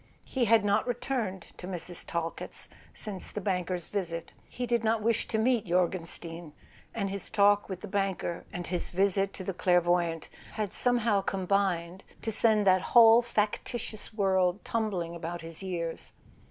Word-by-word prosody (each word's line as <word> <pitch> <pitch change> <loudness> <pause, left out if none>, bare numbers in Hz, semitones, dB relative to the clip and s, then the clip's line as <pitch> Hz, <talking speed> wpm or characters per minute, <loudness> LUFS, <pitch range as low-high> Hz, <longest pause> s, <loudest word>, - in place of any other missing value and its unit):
He 255 -3 0
had 225 -1 +5
not 205 +3 +2
returned 245 -6 -2
to 180 - -8
Mrs. 175 -1 -6
Talkett's 165 0 -4 0.2
since 200 -3 -7
the - - -4
banker's 180 -3 -2
visit; 170 -5 -3 0.2
he 250 - -3
did 235 -1 +1
not 220 -1 +1
wish 230 0 +1
to 220 - -1
meet 230 -1 +2
Jor 180 0 +4
genstein, 165 -2 -8 0.4
and 200 -3 -1
his 200 0 -5
talk 205 -1 +4
with 185 -2 -5
the - - -6
banker, 195 -3 -1
and 175 0 -5
his 175 +1 -2
visit 195 +1 +2
to 190 - -7
the 195 - -3
clairvoyante, 175 -2 +2 0.2
had 210 -4 -3
somehow 235 -5 +2
combined 190 -2 0 0.2
to 225 - -1
send 215 -1 +3
that 185 -1 +5 0.2
whole 230 0 +9
factitious 215 -1 -3
world 190 -3 +1
tumbling 190 -7 -1
about 170 +1 -5
his 165 +1 -8
ears. 170 -3 -4
195 Hz, 160 wpm, -29 LUFS, 175-215 Hz, 0.4 s, whole